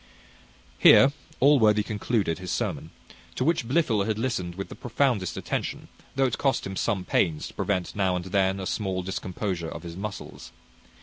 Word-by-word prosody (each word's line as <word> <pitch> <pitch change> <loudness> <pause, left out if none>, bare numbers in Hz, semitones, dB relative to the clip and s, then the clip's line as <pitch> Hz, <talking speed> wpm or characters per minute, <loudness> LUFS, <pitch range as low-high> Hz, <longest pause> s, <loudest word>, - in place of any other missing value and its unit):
Here 135 - +8 0.3
Allworthy 110 -7 +5
concluded 105 -5 -1
his 90 -1 -7
sermon, - - -2 0.5
to - - -1
which 150 -5 +1
Blifil 120 -8 +2
had 110 -1 0
listened 110 -8 -2
with 95 +1 -6
the - - -7
profoundest 120 -6 0
attention, - - -4 0.3
though 135 0 +3
it 125 - -1
cost 135 -3 +1
him 95 - -5
some 95 -3 -1
pains 80 -5 +1
to - - -14
prevent 95 -3 -2
now 95 -3 +1
and 90 0 -3
then 95 0 +1
a 95 - -4
small 95 -2 -2
discomposure 90 -2 -3
of 80 - -8
his 85 -1 -7
muscles. 95 -10 -7
100 Hz, 170 wpm, -26 LUFS, 90-115 Hz, 0.5 s, Here